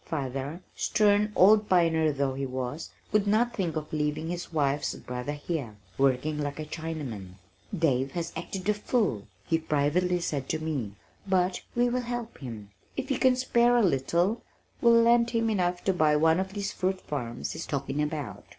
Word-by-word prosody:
Father, 140 +3 -4
stern 210 0 +2
old 210 +3 +6
pioneer 165 -3 +3
though 140 -1 -1
he 135 0 -3
was, 130 +4 -4 0.2
could 210 -1 +2
not 235 +4 +2
think 175 -8 -2
of 155 -1 -5
leaving 150 +1 -1
his 175 -1 -5
wife's 145 -2 0
brother 125 +3 -5
here, 145 -6 -4 0.2
working 140 +4 +1
like 145 0 -3
a 155 - -4
Chinaman. 150 - -6 0.4
"Dave 135 -5 +1
has 170 -1 -3
acted 190 -2 -5
the 210 - +3
fool," 205 - -1 0.2
he 165 - +1
privately 160 +4 +1
said 145 -6 -3
to - - 0
me, 145 -10 -3 0.3
"but 185 -1 +1
we 245 0 +3
will 250 +1 0
help 240 -1 -5
him. 110 -6 -8 0.3
If 270 0 -3
you 265 - 0
can 260 -1 +5
spare 245 -1 +3
a 235 - +4
little, 175 - +1 0.4
we'll 230 -1 +6
lend 235 0 +4
him 230 -1 +1
enough 180 -3 0
to 190 - +2
buy 155 -4 +3
one 160 +3 +4
of 190 0 -3
these 200 -1 -3
fruit 190 0 -1
farms 120 -5 -4
he's - - -6
talking 140 0 -2
about." 150 -2 -4
160 Hz, 180 wpm, -28 LUFS, 140-205 Hz, 0.4 s, old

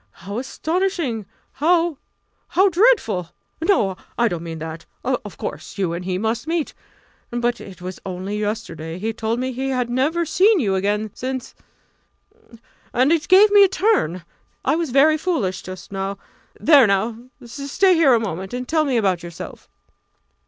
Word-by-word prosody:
How 200 +4 -3
astonishing 315 - -2 0.2
how 335 0 +1 0.5
how 385 +2 +4
dreadful! 335 - +2 0.3
No! 215 - +2 0.2
I 235 - +3
don't 175 -6 -3
mean 165 -1 -6
that. 160 +1 -7 0.2
Of - - -3
course - - -6
you 185 -4 0
and 175 +1 -4
he 185 -1 -1
must 225 +6 -2
meet 325 -2 -1 0.6
but 240 0 -1
it 185 -2 -11
was 185 0 -6
only 190 +2 -4
yesterday 170 -7 -4
he 220 +4 -2
told 225 +1 -2
me 260 +1 -2
he 265 +2 -3
had 250 -2 -1
never 305 +7 +1
seen 390 +6 +4
you 205 -9 +1
again 205 +2 0
since 260 0 -5 1.4
and 255 +5 +3
it 335 -1 +1
gave 400 +3 +7
me 410 -1 +8
a - - +7
turn. 370 - +1 0.4
I - - +3
was 330 -2 -1
very 300 +5 +4
foolish 295 - -1
just 185 +1 -9
now. 195 0 -3 0.4
There 285 -7 +6
now 220 +3 0 0.3
stay 285 +10 +1
here 315 -7 +5
a - - +2
moment 190 0 -4
and 250 0 -4
tell 315 -1 +2
me 265 -4 +1
about 190 -6 +1
yourself." 170 0 -9
240 Hz, 160 wpm, -21 LUFS, 195-320 Hz, 1.4 s, me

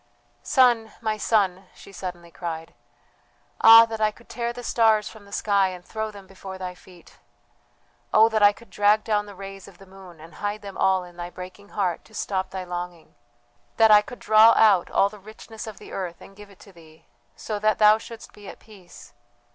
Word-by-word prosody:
"Son, 240 -4 +2
my 220 -1 -2
son!" 195 -4 0
she - - -15
suddenly 175 -2 -8
cried, 165 -2 -7 0.9
"ah 225 0 +9
that 225 -1 -7
I 215 - +3
could 235 +3 -18
tear 235 -1 -3
the 245 +1 -9
stars 220 -3 +2
from 215 -2 -13
the 200 - -18
sky 200 -2 +1
and 180 -1 -9
throw 220 0 -4
them 200 -2 -13
before 190 0 -10
thy 185 -1 -6
feet! 180 -1 -19 0.9
Oh 220 +1 +6
that 220 -1 -1
I 205 0 +7
could 230 +3 -18
drag 210 +1 +2
down 210 -2 -1
the 205 - -11
rays 195 0 -10
of 195 -3 -16
the 195 - -16
moon 190 -3 -15
and 165 +2 -14
hide 205 +1 -3
them 200 -1 -9
all 190 -1 +1
in 175 -1 -15
thy 175 0 -6
breaking 185 +3 -11
heart 185 -5 -2
to 220 - -18
stop 190 -2 -3
thy 190 0 -6
longing! 175 -2 -7 0.6
that 225 -1 +5
I 210 0 +8
could 245 +4 -11
draw 220 +1 +6
out 200 -5 +4
all 200 - +2
the 210 0 -14
richness 220 +2 -11
of 215 - -9
the - - -13
earth 180 -3 -5
and 195 - -15
give 205 0 -14
it 200 - -19
to 200 - -16
thee, 160 -2 -19 0.3
so 215 -2 -5
that 215 0 +1
thou 215 0 +5
shouldst 230 0 -12
be 205 -1 -14
at - - -11
peace! 195 -5 -16
200 Hz, 210 wpm, -24 LUFS, 185-215 Hz, 0.9 s, ah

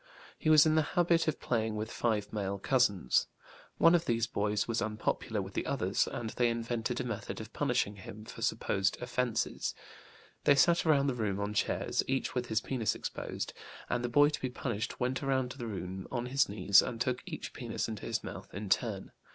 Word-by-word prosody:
He 155 - +1
was 155 -1 +8
in 155 - +4
the 155 - +4 0.2
habit 170 -1 +4
of 155 - 0
playing 110 -2 -1
with 110 +1 -3
five 105 -3 -1
male 100 -2 -2
cousins. 100 - +2 0.5
One 165 - +6
of 170 -1 +3
these 115 -5 +1
boys 105 -2 0
was 115 -1 0
unpopular 110 0 -1
with - - -9
the - - -2
others, - - +1
and 115 -2 -4
they 120 -1 +2
invented 115 0 -2
a - - -1
method - - -4
of - - -9
punishing 100 +1 0
him 105 +2 -10
for - - -10
supposed 95 0 0
offenses. 125 -1 -1 0.7
They 145 - +7
sat 170 +4 +4
around 140 -3 +4
the 140 - +1
room 105 -5 -1
on 100 +1 -2
chairs, - - 0
each 135 0 -1
with 125 -1 -2
his 110 -1 +1
penis 120 -5 -1
exposed, - - -5 0.4
and 120 - 0
the 120 - -1
boy 145 +4 +6
to 150 - -4
be 130 - -1
punished 120 -4 -3
went 130 +1 0
around 130 -2 0
the 125 -3 -6
room 95 -2 -5
on 120 -2 -2
his 130 -1 +2
knees 100 -1 +5
and 115 - -4
took 125 +1 0
each 160 -4 -6
penis 120 -4 -3
into 110 -3 -5
his - - -1
mouth - - -8
in 105 0 -5
turn. 100 -2 0
120 Hz, 200 wpm, -32 LUFS, 105-130 Hz, 0.7 s, was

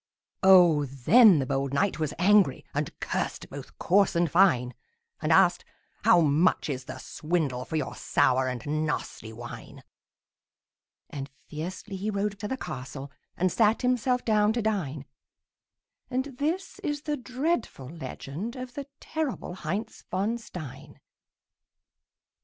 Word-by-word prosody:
Oh, 175 -6 +6
then 175 - +6
the 135 - 0
bold 135 +1 -1
knight 200 +3 +1
was 155 -2 -1
angry, 195 -6 +4
And - - -3
cursed - - -3
both - - -9
coarse 195 +1 +3
and 170 -3 +2
fine; 145 -10 +4 0.5
And - - 0
asked, - - +5 0.4
"How 175 - +6
much 160 +2 +2
is 130 -1 -5
the - - -7
swindle 150 -6 -2
For - - -5
your 155 -4 -2
sour 130 0 +2
and 125 -3 -4 0.2
nasty 110 -6 -4
wine?" 120 +2 -10 1.3
And 140 -1 -6 0.2
fiercely 185 +6 -6
he 205 +3 -3
rode 200 0 -2
to 210 - -4
the 265 - -3
castle 135 - -7 0.3
And 185 0 +1
sat 220 +2 +2
himself 250 0 +1
down 215 -1 +3
to 235 - -1
dine; 155 -10 -2 1.0
And 260 +1 -2
this 330 +7 -2
is 295 0 -3
the 300 -1 -1
dreadful 255 - -2
legend 160 - -6
Of 255 -1 -7
the 285 0 -6
terrible 310 - -3
Heinz 190 +5 -5
von 210 +5 -1
Stein. 160 - -10
185 Hz, 135 wpm, -27 LUFS, 140-230 Hz, 1.3 s, Oh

